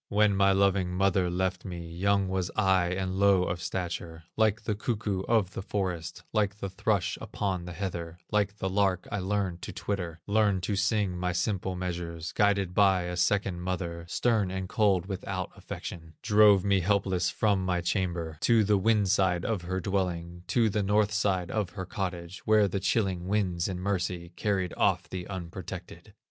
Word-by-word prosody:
When 105 -1 +3
my 100 0 +4
loving 95 -2 +2
mother 95 -1 +2
left 90 +1 -1
me, 85 -3 -6
Young 100 +3 +1
was 95 -1 -1
I, 95 -4 +3
and 95 +1 -2
low 100 -2 +5
of 85 -1 -3
stature; 85 -2 -4
Like 110 0 +2
the 105 - -1
cuckoo 105 -3 -2
of 110 -6 +2
the - - -5
forest, 90 -5 -3
Like 105 -2 +1
the 100 -2 -5
thrush 95 - 0
upon 95 -3 -3
the 90 - -6
heather, 85 -3 -4
Like 105 -1 +1
the 95 - -2
lark 95 -1 +1
I 105 - -1
learned 95 -2 -1
to - - -6
twitter, 90 -5 -4
Learned 100 -3 +2
to 100 - 0
sing 100 -1 +1
my 90 0 -1
simple 95 0 -1
measures, 85 -2 -4
Guided 100 -3 +2
by 95 -2 +4
a 90 0 -4
second 95 0 +1
mother, 85 -2 -3
Stern 110 -2 +1
and 95 0 -3
cold, 100 -4 +2
without 95 -1 -4
affection; 80 -2 -8
Drove 105 -3 +6
me 100 -1 +3
helpless 95 -2 +1
from 100 -3 +1
my 90 -1 0
chamber 85 -3 -2
To 115 -2 +4
the 105 -1 +3
wind 105 0 +3
side 95 -2 +2
of 110 -5 -1
her 95 +2 -3
dwelling, 90 -2 -2
To 115 -2 +3
the 105 0 0
north 105 +1 +2
side 95 -4 0
of 105 -4 -1
her 95 - -5
cottage, 90 -1 -4
Where 110 -1 +5
the 100 +1 -2
chilling 95 -2 0
winds 95 -4 0
in 95 -2 -4
mercy 90 -2 -2
Carried 95 -4 -1
off - - +1
the 90 -1 -6
unprotected. 95 -2 -8
95 Hz, 180 wpm, -28 LUFS, 90-100 Hz, -, Drove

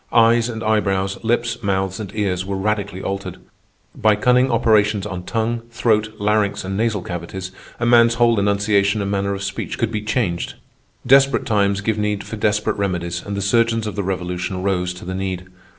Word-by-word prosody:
Eyes 115 0 +4
and 110 -1 -5
eyebrows, 100 -3 0
lips, 120 0 0
mouths, 95 -1 -1
and 105 -3 -6
ears, 95 -4 0
were 95 0 -3
radically 100 -1 -2
altered. 100 0 -4 0.6
By 110 -1 +3
cunning 125 +4 +3
operations 105 -3 +2
on 90 -3 -5
tongue, 115 +1 -1
throat, 110 -2 0
larynx, 105 -1 +1
and 95 +1 -4
nasal 105 -3 0
cavities 90 +2 -6 0.3
a 120 - 0
man's 115 -1 +5
whole 115 -2 +3
enunciation 100 0 +2
and 100 - -2
manner 100 0 0
of 100 - -6
speech - - -4
could 115 -1 -1
be 105 -2 -2
changed. 105 -5 -1 0.5
Desperate 135 +1 +4
times 100 -2 +1
give 110 +1 -1
need 105 -1 -1
for - - -7
desperate 105 0 0
remedies, 85 -3 -2
and 100 0 -5
the 100 - -1
surgeons 115 +2 +2
of 105 - -4
the 100 - -1
Revolution 90 0 -3
rose 90 -2 0
to 90 - -10
the 95 - -4
need. 95 -1 -3
105 Hz, 180 wpm, -20 LUFS, 95-115 Hz, 0.6 s, man's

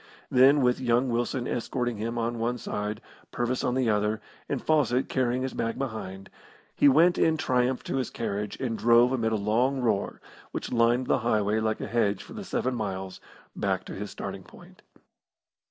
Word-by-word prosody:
Then, 135 +2 +6
with 125 0 +2
young 125 +1 +2
Wilson 120 +1 -1
escorting 120 -1 -2
him 115 +3 -3
on 115 0 -2
one 120 +2 -1
side, 105 -2 -4 0.3
Purvis 120 +1 -1
on 125 - 0
the 130 -2 +1
other, 105 +1 0 0.3
and 140 - -1
Fawcett 135 -5 +1
carrying 130 -1 0
his 130 - -3
bag 115 0 -2
behind, 105 -7 -5 0.4
he 145 - +6
went 165 +6 +4
in 160 -1 +3
triumph 125 -2 0
to - - -2
his 130 -3 -1
carriage, 105 -2 -4
and 120 -4 -2
drove 120 +2 +5
amid 115 -4 0
a - - +1
long 115 +6 +1
roar, 110 -5 0 0.3
which - - -5
lined 120 +2 +3
the - - +2
highway 110 -2 +1
like 110 0 -1
a - - -2
hedge 100 -4 0
for - - -12
the 210 - -6
seven 130 -8 -1
miles, 95 -5 -4 0.3
back - - -1
to - - -7
his 105 +1 -5
starting 100 -1 -6
point. 90 - -16
120 Hz, 185 wpm, -27 LUFS, 110-130 Hz, 0.4 s, Then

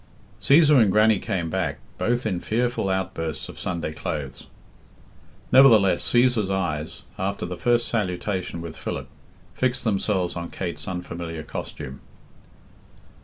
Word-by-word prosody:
Cæsar 150 -2 +6
and 105 -4 +4
Grannie 110 0 +4
came 85 -3 -2
back, - - -1 0.2
both 120 +1 0
in 95 -5 0
fearful 120 0 -1
outbursts 80 -6 -3
of - - -10
Sunday 85 -3 -3
clothes. 70 -3 -5 1.0
Nevertheless 110 -9 +6
Cæsar's 120 -5 +2
eyes, 80 -5 -2 0.2
after 100 +2 -2
the 90 - -5
first 120 +5 +2
salutation 95 -4 -2
with 85 -1 -7
Philip, - - -5 0.4
fixed 130 0 -1
themselves 95 -4 0
on 85 0 -5
Kate's 90 -3 -5
unfamliar 85 -3 -5
costume. 65 +1 -7
95 Hz, 120 wpm, -24 LUFS, 85-115 Hz, 1.0 s, Cæsar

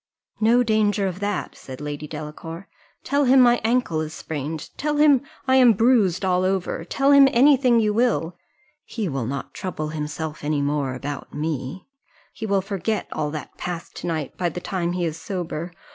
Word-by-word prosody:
"No 235 +3 +4
danger 210 -3 +2
of 185 -1 -3
that," 205 -1 -3
said 130 -1 -10
Lady 150 0 -5
Delacour: 160 +4 -8 0.4
"tell 285 0 +1
him 260 +1 +6
my 245 -1 +5
ankle 225 -9 +1
is 155 0 -5
sprained 155 0 -5
tell 300 0 -1
him 290 -4 +5 0.3
I 260 0 +5
am 250 -3 +7
bruised 210 -5 +3
all 180 -1 +2
over 185 -3 -1
tell 275 +10 +1
him 280 -1 +8
any 275 +4 +6
thing 250 -3 +3
you 210 -2 +2
will 215 -7 +1 0.5
he 220 -4 -4
will 135 -7 -2
not 140 +2 -5
trouble 155 -5 -4
himself 155 0 -5
any 145 -1 0
more 140 -2 -1
about 140 +2 -6
me 150 +2 -4 0.5
he 220 - -5
will 200 -1 +2
forget 200 +2 -2
all 150 - -2
that 150 0 -8
passed 175 -2 -5
to - - -5
night 155 -5 -3
by 175 -1 0
the 175 - -6
time 175 -1 -2
he 180 -1 -1
is 160 -1 -3
sober. 175 -2 -4
180 Hz, 185 wpm, -23 LUFS, 155-225 Hz, 0.5 s, him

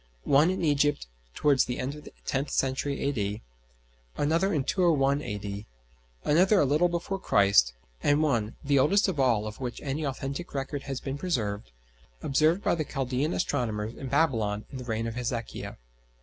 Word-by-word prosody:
One 150 +5 +5
in 185 -1 -2
Egypt 145 -1 +2 0.3
towards 140 -3 +3
the 125 - -3
end 130 +2 -3
of 150 0 -11
the - - -12
tenth 140 +2 -1
century 135 +1 -1
A.D.; 105 -7 -2 0.7
another 165 +6 +2
in 150 -7 +1
201 145 -5 +2
A.D.; 105 -3 -5 0.6
another 185 +7 +4
a - - +4
little 150 +6 +3
before 175 +3 -3
Christ; 100 - +4 0.3
and 145 +2 +3
one, 115 -7 0
the 140 -1 +3
oldest 200 +11 +4
of 180 -7 -2
all 120 -5 +3
of 110 0 -7
which 125 -3 -4
any 145 +2 -2
authentic 140 +4 -4
record 140 +1 -3
has 135 -1 -2
been 135 +1 -5
preserved, 105 - -2 0.5
observed 155 +7 +2
by - - +2
the 165 -2 0
Chaldæan 135 +2 -2
astronomers 115 -9 -1
in 135 - -7
Babylon 110 -8 +1
in 135 - -6
the 125 - -7
reign 115 -1 -2
of 115 - -3
Hezekiah. 120 -1 -4
135 Hz, 170 wpm, -28 LUFS, 115-150 Hz, 0.7 s, One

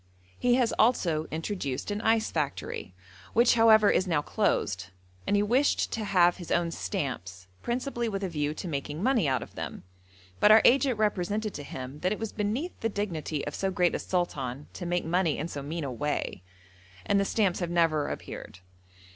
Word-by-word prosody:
He 245 0 +3
has 245 -2 +2
also 170 -9 +2
introduced 160 -2 -3
an 205 +1 -2
ice 225 -1 +2
factory, 145 - -3 0.4
which, 235 +2 +5
however, 220 -2 +6
is 185 - +1
now 155 -4 +1
closed, 100 - 0 0.4
and - - +2
he 205 - +3
wished 255 +7 +2
to 225 - -2
have 180 -4 +4
his 175 - -9
own 170 -1 +1
stamps, 110 - -4 0.2
principally 240 -1 -2
with 200 -1 -3
a - - 0
view 150 -3 -2
to 180 - -6
making 150 +2 -4
money 240 - +3
out 130 -2 +1
of - - -14
them; - - -6 0.6
but 210 - +6
our 220 +1 +8
agent 265 -1 +4
represented 210 0 0
to - - -6
him 135 0 -7
that 185 +3 0
it 210 - -1
was 225 -2 -4
beneath 225 - -2
the 225 - 0
dignity 165 -8 -3
of 145 - -4
so 195 - -1
great 180 -2 +2
a - - -1
sultan 145 -7 -2
to 175 - -6
make 175 -1 0
money 170 -1 +1
in 155 - -3
so 145 -4 -6
mean 155 +4 -4
a 135 - -3
way, 145 -7 -2 0.6
and 200 - +3
the - - +3
stamps 195 -2 +1
have 175 -2 -2
never 165 -4 +2
appeared. - - -7
180 Hz, 190 wpm, -28 LUFS, 150-215 Hz, 0.6 s, our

